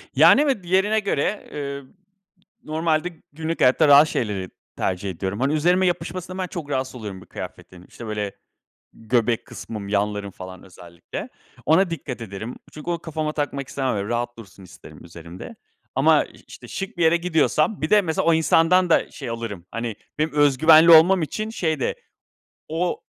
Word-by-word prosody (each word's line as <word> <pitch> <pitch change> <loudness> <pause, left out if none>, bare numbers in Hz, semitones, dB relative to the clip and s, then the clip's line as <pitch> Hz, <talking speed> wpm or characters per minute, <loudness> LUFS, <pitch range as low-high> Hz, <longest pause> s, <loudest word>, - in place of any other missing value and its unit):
Yani, 280 - +7
evet, 275 -10 0
diğerine 190 +5 +2
göre, 200 0 -2
ııı, 140 -2 -6 0.7
normalde 160 +1 0 0.2
günlük 160 +2 -4
hayatta 130 +5 +4
rahat 145 +2 +8
şeyleri 100 -8 -2 0.3
tercih 95 +1 -2
ediyorum. 95 +4 -4
Hani, 140 +3 +1
üzerime 180 +4 +3
yapışmasından 180 +1 -3
ben 185 - -2
çok 165 -5 -7
rahatsız 130 -2 -2
oluyorum 105 -6 -7
bir - - -15
kıyafetin, 90 0 -10
işte, 120 - -10
böyle 105 -2 -3 0.6
göbek 115 0 0
kısmım, 105 -3 -8
yanlarım, 100 0 -1
falan, 95 -1 -10
özellikle 85 -2 -9 0.4
ona 170 +4 +4
dikkat 145 -7 -5
ederim. 110 +3 -7 0.2
Çünkü 155 +3 -6
onu 170 - -1
kafama 155 -1 -3
takmak 140 -3 -3
istemem, 130 -4 -2
öyle 100 0 -3
rahat 120 0 -2
dursun 100 -3 -13
isterim 90 - -14
üzerimde 85 - -10 0.4
ama - - +4
iş - - -18
işte - - -12
şık 195 -1 -5
bir 170 - +2
yere 160 +1 +5
gidiyorsam 170 +1 +1
bir 155 - -1
de, 210 - +6
mesela, 160 -4 -1
o 165 - +5
insandan 165 +3 +3
da - - +3
şey 135 - -8
alırım. 115 -6 -6
Hani, 115 -1 -4 0.2
benim 155 0 0
öz 145 -3 +3
güvenli 160 +2 +7
olmam 170 +2 +7
için 215 +8 -3
şey 160 -9 -1
de - - -1 0.7
o 170 +3 -2
145 Hz, 170 wpm, -23 LUFS, 105-165 Hz, 0.7 s, rahat